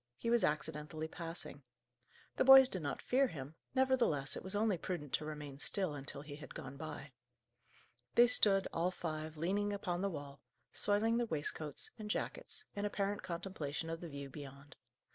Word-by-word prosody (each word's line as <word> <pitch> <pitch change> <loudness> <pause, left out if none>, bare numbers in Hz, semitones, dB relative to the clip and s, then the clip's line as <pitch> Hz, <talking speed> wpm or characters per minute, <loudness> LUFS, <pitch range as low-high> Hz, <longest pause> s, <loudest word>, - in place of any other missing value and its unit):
He 230 - -1
was 235 -1 +4
accidentally 155 +1 -1
passing. 165 +1 -6 0.8
The - - +4
boys 265 0 +10
did 185 -8 -3
not 145 - -3
fear 265 +2 +3
him; 145 - -7 0.2
nevertheless, 250 - +2
it - - -5
was 190 +2 -4
only 210 -1 +3
prudent 155 -7 -4
to 150 - 0
remain 150 -3 -6
still, 185 0 -1
until 140 0 -6
he 145 -1 -8
had 150 - -10
gone 135 +1 -7
by. 150 -1 -7 1.0
They 240 - +9
stood, 200 -5 +6
all 170 +2 +2
five, 155 -3 -4
leaning 200 +6 0
upon 185 -3 -2
the 200 - +1
wall, 145 -4 -7 0.3
soiling 215 +3 +2
their 240 -1 +1
waistcoats 150 -3 -3
and 210 -1 -5
jackets, 430 - -3
in 200 - -2
apparent 205 0 -1
contemplation 170 -3 -4
of 165 - -4
the 170 - -6
view 140 -1 -6
beyond. 140 0 -10
165 Hz, 170 wpm, -36 LUFS, 150-205 Hz, 1.0 s, boys